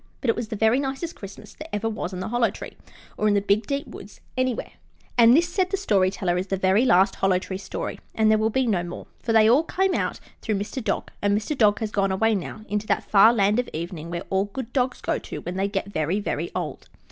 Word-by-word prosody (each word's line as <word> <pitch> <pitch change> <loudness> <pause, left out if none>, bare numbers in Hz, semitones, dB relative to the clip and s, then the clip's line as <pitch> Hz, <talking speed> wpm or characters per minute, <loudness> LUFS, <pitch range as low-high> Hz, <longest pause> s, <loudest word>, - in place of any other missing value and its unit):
But 245 - +2
it - - -4
was 235 - -4
the 215 - -5
very 220 +4 +3
nicest 275 +5 -3
Christmas 195 -1 -11
that 310 -4 -7
ever 210 +2 -1
was 210 -4 -3
in 185 -1 -5
the 185 - -4
Hollow 240 0 +2
Tree, - - -9 0.4
or 215 - +1
in 205 - +3
the - - +4
Big 205 +2 +1
Deep 280 0 -2
Woods - - -12 0.2
anywhere. 255 -2 -1 0.4
And 235 +2 +7
this, 340 +1 +3
said 365 +1 0
the 390 - -1
Story 200 - +2
Teller, 180 -2 -1
is 185 - -4
the 195 - -1
very 190 +6 +3
last 190 -4 +4
Hollow 195 -1 +3
Tree 190 0 -5
story, 195 -1 -5 0.2
and 220 -1 +4
there 215 - +4
will 220 +1 +2
be 260 +3 +1
no 200 -7 +1
more, 175 0 -7 0.2
for 230 - -2
they 220 -1 +6
all 255 +8 +5
came 380 +3 0
out - - -1 0.2
through 215 - -1
Mr. 210 +5 -4
Dog, 215 - -2
and 205 0 +2
Mr. 220 +8 -3
Dog 210 -5 +4
has 215 -1 -2
gone 195 -2 +1
away 225 +4 +2
now 205 +2 -4
into 210 0 -2
that - - +1
Far 210 +2 +6
Land 210 0 +2
of 250 - -2
Evening 170 0 -5
where 170 +1 -4
all 190 +1 +2
good 235 +4 -7
dogs 255 -1 0
go - - -1
to - - -7
when 180 - -5
they 195 +1 0
get 200 0 -3
very, 160 +5 0
very 205 - -3
old. - - -5
215 Hz, 255 wpm, -24 LUFS, 195-240 Hz, 0.4 s, And